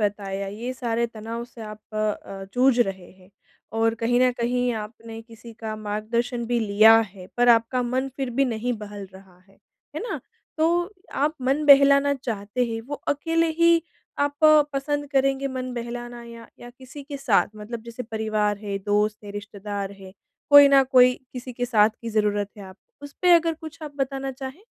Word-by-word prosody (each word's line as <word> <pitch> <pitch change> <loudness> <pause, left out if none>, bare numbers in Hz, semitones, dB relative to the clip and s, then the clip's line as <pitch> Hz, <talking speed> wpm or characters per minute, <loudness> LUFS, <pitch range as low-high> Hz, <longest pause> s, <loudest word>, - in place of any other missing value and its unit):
बताया 200 -1 -2
ये 225 +6 -5
सारे 235 -2 -1
तनाव 230 +1 -7
से 240 -1 -15
आप 215 0 -8
अ - - -6
अ, 210 -2 -3
जूझ 255 0 +3
रहे 190 -5 -2
हैं 185 0 -21 0.5
और 225 0 +2
कहीं 235 +2 +1
न 255 0 +5
कहीं 245 +1 0
आपने 225 +1 -8
किसी 230 0 -13
का 220 -1 -4
मार्गदर्शन 225 +3 -2
भी 240 0 0
लिया 215 +1 +6 0.2
है। 185 -3 -12
पर 245 0 +3
आपका 235 +2 +3
मन 255 +2 -1
फिर 265 -3 -3
भी 275 - +5
नहीं 245 0 -2
बहल 205 -2 -8
रहा 190 -2 -16
है, 195 - -25 0.4
है - - -2
ना? 475 - -4 0.4
तो 345 +4 +1 0.2
आप 295 +3 0
मन 275 +4 +1
बहलाना 280 0 +6
चाहते 235 -2 -3
हैं 225 -1 -4
वो 290 - -4
अकेले 330 +3 +1
ही 335 0 +5 0.4
आप 285 0 0 0.4
पसंद 290 +1 -2
करेंगे 275 0 +1
मन 255 -1 -5
बहलाना 240 0 -6
या 230 0 -12
या 240 - -10
किसी 260 +3 -12
के 280 0 -7
साथ 250 -7 +2
मतलब 220 +2 -7
जैसे 235 +2 -7
परिवार 215 -2 -1
है, 200 -1 -4
दोस्त 210 +1 0
है, 200 - -8
रिश्तेदार 205 -1 -6
है, 190 -1 -13 0.4
कोई 285 -1 +10
न 275 -1 +6
कोई 250 0 +6 0.2
किसी 250 0 -7
के 245 +1 -3
साथ 215 -3 +4
की 230 - -6
ज़रूरत 205 -1 0
है 200 - -9
आप 190 0 -12 0.3
उस 285 -1 -9
पे 360 - +5
अगर 330 -1 +3
कुछ 320 0 -11
आप 300 -2 -7
बताना 270 0 -2
चाहें? 265 +8 -8
235 Hz, 185 wpm, -24 LUFS, 210-270 Hz, 0.5 s, कोई